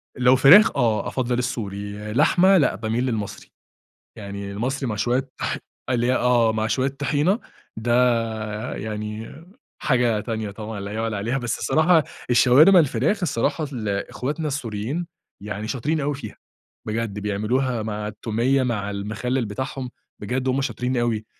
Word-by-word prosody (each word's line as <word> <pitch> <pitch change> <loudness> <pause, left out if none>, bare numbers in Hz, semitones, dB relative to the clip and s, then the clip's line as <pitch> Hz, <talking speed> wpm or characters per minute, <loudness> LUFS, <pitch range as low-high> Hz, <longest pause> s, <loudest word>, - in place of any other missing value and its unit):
لو 125 +1 +5
فراخ 165 - +8
آه 115 -4 +1
أفضل 125 -2 -1
السوري، 105 -3 -4
لحمة 185 +8 +5
لأ 145 - +2
بأميل 115 +3 -1
للمصري، 105 -5 -4 0.7
يعني 100 0 -6
المصري 130 +6 -2
مع 105 - -2
شويّة 125 +4 0
طـح - - -1 0.5
آه 120 -3 +3
مع 110 0 -1
شويّة 130 +4 +1
طحينة، 145 - 0 0.4
ده 120 +2 -1 0.8
يعني 105 +1 -5 0.5
حاجة 120 -5 +2
تانية 110 -2 -4
طبعًا 105 0 -7
لا 100 +1 -6
يُعلي 110 -1 -2
عليها. 115 +7 -1
بس 120 -2 -2
الصراحة 160 0 +3 0.3
الشاورما 130 +10 +7
الفراخ، 150 - +2
الصراحة 150 0 0 0.4
إخوتنا 150 +4 -3
السوريين 130 +4 -3 0.4
يعني 105 +1 -5
شاطرين 150 +6 -1
أوي 145 +1 -1
فيها 125 -7 -8 0.5
بجد 110 -1 -3
بيعملوها 110 +4 -1
مع 105 -1 -4
التومية 115 +5 0
مع 105 -5 -1
المخلل 110 +5 -2
بتاعهم 130 +4 -5 0.3
بجد 125 +5 -2
هم 130 +2 +1
شاطرين 130 -2 -2
أوي. 115 -2 0
120 Hz, 135 wpm, -23 LUFS, 105-135 Hz, 0.8 s, فراخ